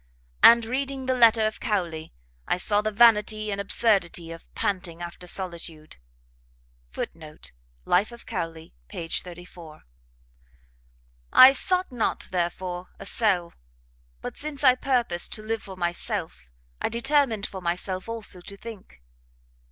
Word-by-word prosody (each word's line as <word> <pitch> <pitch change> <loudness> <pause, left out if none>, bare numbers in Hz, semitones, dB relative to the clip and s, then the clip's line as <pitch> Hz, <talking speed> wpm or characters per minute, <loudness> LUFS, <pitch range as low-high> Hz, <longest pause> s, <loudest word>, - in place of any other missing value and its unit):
] - - -33
and 235 -1 +1
reading 265 +2 -3
the 260 - +1
letter 230 -3 +5
of 215 - -2
Cowley, 170 -7 -2 0.4
I - - +1
saw 205 +3 +2
the 215 - -1
vanity 215 -1 +4
and 200 0 -2
absurdity 195 -5 +1
of 165 0 -11
panting 180 -4 -2
after 175 +1 -8
solitude. 170 -4 -5 0.9
[Footnote: 155 - -6 0.3
Life 195 +6 +2
of 235 0 -12
Cowley, 165 -5 -5
p.34.] 170 - -7 1.5
"I 260 +1 +10
sought 365 +6 0
not, 240 -3 -2
therefore, 180 0 -2
a - - -10
cell; 190 -5 +1 0.7
but, - - -6
since 295 -1 -3
I 255 -2 +8
purposed 245 -9 0
to 215 - -7
live 225 +1 -2
for 190 -2 -10
myself, 175 - -3 0.3
I - - 0
determined 235 -2 +1
for 190 - -7
myself 185 +3 -3
also 220 -5 -4
to 200 +3 -10
think. 200 - -11
200 Hz, 130 wpm, -26 LUFS, 175-230 Hz, 1.5 s, I